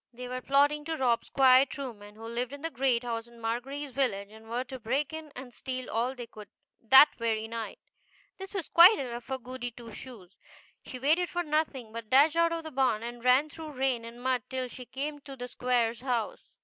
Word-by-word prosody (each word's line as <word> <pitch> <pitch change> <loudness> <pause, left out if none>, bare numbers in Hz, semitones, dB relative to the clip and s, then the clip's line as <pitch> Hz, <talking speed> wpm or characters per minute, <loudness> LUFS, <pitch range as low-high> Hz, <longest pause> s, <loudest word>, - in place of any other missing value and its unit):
They 250 +1 -8
were 255 +1 -4
plotting 285 +3 +3
to 325 0 -3
rob 245 -4 +2
Squire 260 -1 +6
Trueman, 235 -7 -7
who 220 - -12
lived 240 +3 -3
in 285 +1 -9
the 325 - -2
great 255 -4 +1
house 230 -1 -4
in 235 0 -17
Margery's 260 +5 -4
village, 225 -7 -1
and 220 +1 -14
were 240 +2 -1
to 260 +1 -8
break 265 +6 -1
in 315 -1 -7
and 250 -1 -9
steal 255 -1 -5
all 240 +4 0
they 245 -2 -7
could 215 -2 -12 0.3
that 265 +5 +8
very 225 -1 -1
night. 230 -1 -5 0.6
This 385 0 -8
was 370 -5 -2
quite 360 +6 +8
enough 240 -3 -5
for 265 0 -3
Goody 255 -1 -6
Two 235 -1 -12
Shoes. 210 -6 -10 0.5
She 255 - -8
waited 315 +7 +2
for 350 0 -2
nothing, 295 -7 -1
but 230 -2 -7
dashed 290 +4 +5
out 335 0 +3
of 335 0 -3
the 315 - -7
barn, 255 -5 +1
and 240 0 -7
ran 255 +4 +5
through 315 -1 -8
rain 260 -3 0
and 230 +1 -10
mud 255 -1 +1
till 260 -1 -3
she 250 +1 -9
came 290 +4 -4
to 275 -1 -10
the 245 -1 -6
Squire's 240 -2 0
house. 245 -4 -3
255 Hz, 215 wpm, -29 LUFS, 235-280 Hz, 0.6 s, that